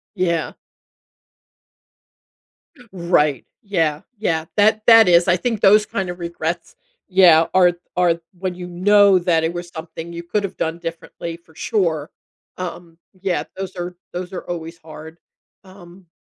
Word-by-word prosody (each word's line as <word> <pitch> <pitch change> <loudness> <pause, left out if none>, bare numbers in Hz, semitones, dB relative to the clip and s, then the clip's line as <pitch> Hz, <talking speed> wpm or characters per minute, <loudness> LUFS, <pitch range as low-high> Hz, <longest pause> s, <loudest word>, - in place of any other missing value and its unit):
Yeah. 170 -3 -1 2.4
Right, 170 -6 +1 0.2
yeah, 165 -7 0 0.2
yeah. 160 -6 -1
That 215 +1 +3
that 225 -3 +8
is 170 0 +5
I 180 0 +4
think 225 +1 -2
those 210 +2 +6
kind 190 -2 -3
of 175 0 -6
regrets, 170 - -4 0.3
yeah, 175 -4 +6
are 180 -2 +5 0.2
are 175 -2 +2 0.2
when 185 -1 -3
you 180 0 -7
know 195 +2 +4
that 170 -2 +1
it 165 +2 -1
was 175 0 -6
something 165 +1 -8
you 170 0 -6
could 205 +4 -1
have 200 - -5
done 165 +1 -2
differently 165 0 -7
for 165 -2 -25
sure. 165 -8 -1 0.5
Um, 175 -2 -7 0.2
yeah, 175 -6 -1
those 190 -1 -6
are 180 0 -5 0.2
those 180 +1 -5
are 180 - -4
always 165 -1 -6
hard. 160 +1 -12 0.5
Um 185 -1 -16
175 Hz, 145 wpm, -20 LUFS, 165-185 Hz, 2.4 s, that